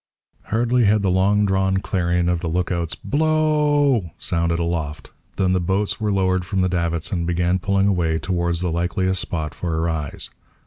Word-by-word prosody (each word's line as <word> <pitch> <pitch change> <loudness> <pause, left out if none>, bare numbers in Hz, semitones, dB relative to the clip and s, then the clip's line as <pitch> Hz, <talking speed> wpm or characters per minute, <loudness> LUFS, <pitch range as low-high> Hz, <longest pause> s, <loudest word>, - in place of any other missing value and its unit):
Hardly 120 +2 +1
had 105 0 +3
the 95 - +2
long 100 +3 +3
drawn 95 0 +1
clarion 90 -2 0
of 90 -1 +1
the 85 - -4
look 90 +2 -1
out's 85 -2 -2
B 145 - -3
l - - +3
o 150 -2 +3
w! 90 -4 -9
sounded 85 -1 0
aloft 85 -3 -3 0.3
than 95 -1 +2
the 90 - +2
boats 95 +5 -1
were 105 -1 0
lowered 95 -2 +1
from 95 +1 -1
the 95 - +2
davits 85 -2 -1
and 85 -3 -1
began 90 +1 +1
pulling 100 +1 +1
away 85 -5 +1
towards 85 +1 -1
the 90 -2 -1
likeliest 90 +2 0
spot 80 -3 -3
for 85 -3 -3
a - - 0
rise. 80 -4 -3
90 Hz, 195 wpm, -21 LUFS, 85-100 Hz, 0.3 s, had